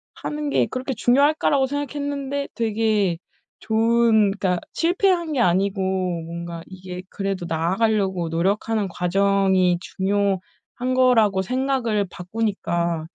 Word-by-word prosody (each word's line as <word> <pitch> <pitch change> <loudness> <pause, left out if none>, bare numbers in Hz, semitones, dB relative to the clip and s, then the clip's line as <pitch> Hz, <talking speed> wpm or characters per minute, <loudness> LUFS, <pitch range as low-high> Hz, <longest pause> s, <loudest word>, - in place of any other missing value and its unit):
하는 300 -1 -4
게 - - +2
그렇게 260 +1 -3
중요할까?'라고 275 +3 +3
생각했는데 285 0 -3
되게 215 -5 +1 0.4
좋은 225 -1 +3
그니까 185 -3 0
실패한 345 -1 +1
게 250 - 0
아니고 195 0 +2 0.5
뭔가 170 0 -6
이게 185 -1 -8
그래도 195 -2 -3
나아가려고 190 +1 0
노력하는 200 +5 0
과정이 190 0 +2
중요한 195 +1 0 0.6
거라고 225 -7 +4
생각을 250 -3 0
바꾸니까 175 -5 -2
205 Hz, 290 characters per minute, -22 LUFS, 185-255 Hz, 0.6 s, 거라고